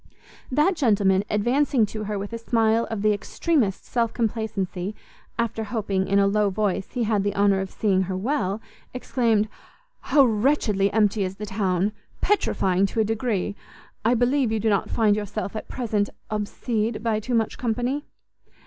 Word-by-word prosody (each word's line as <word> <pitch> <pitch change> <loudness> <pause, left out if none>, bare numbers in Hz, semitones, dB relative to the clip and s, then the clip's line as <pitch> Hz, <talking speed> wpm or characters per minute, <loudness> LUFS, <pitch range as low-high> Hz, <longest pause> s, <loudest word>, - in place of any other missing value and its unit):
That 300 +8 +3
gentleman, 200 - +3
advancing 240 +3 +2
to 215 +1 -6
her 210 0 -2
with 200 +3 -5
a 230 - -3
smile 230 0 +2
of 220 -3 -3
the 215 0 +4
extremest 215 - 0
self 230 -2 0
complacency, 210 -4 -2 0.4
after 225 -1 -1
hoping, 200 -4 -1
in 200 - +2
a 200 - +5
low 205 +1 +2
voice, 195 -1 -1
he 245 - 0
had 215 -2 +1
the 205 0 -1
honour 200 -1 +3
of 190 - -4
seeing 195 -2 +1
her 185 - -2
well, 210 -3 -1 0.4
exclaimed, 230 -4 +1 0.5
"How 280 -2 +4
wretchedly 215 -4 +2
empty 210 -1 +2
is 185 0 -3
the 210 - -6
town! 195 -1 0 0.3
petrifying 195 - +2
to 225 - -4
a - - +5
degree! 215 -2 -1 0.5
I 235 +3 +3
believe 245 0 +2
you 220 - 0
do 220 +1 +1
not 200 - +1
find 215 -3 +3
yourself 210 0 -4
at 215 - -5
present 215 -5 -1 0.2
obsede 215 +1 -2
by 225 -2 +1
too 240 +3 -2
much 225 -2 0
company?" 245 +4 -1
215 Hz, 165 wpm, -24 LUFS, 200-235 Hz, 0.5 s, a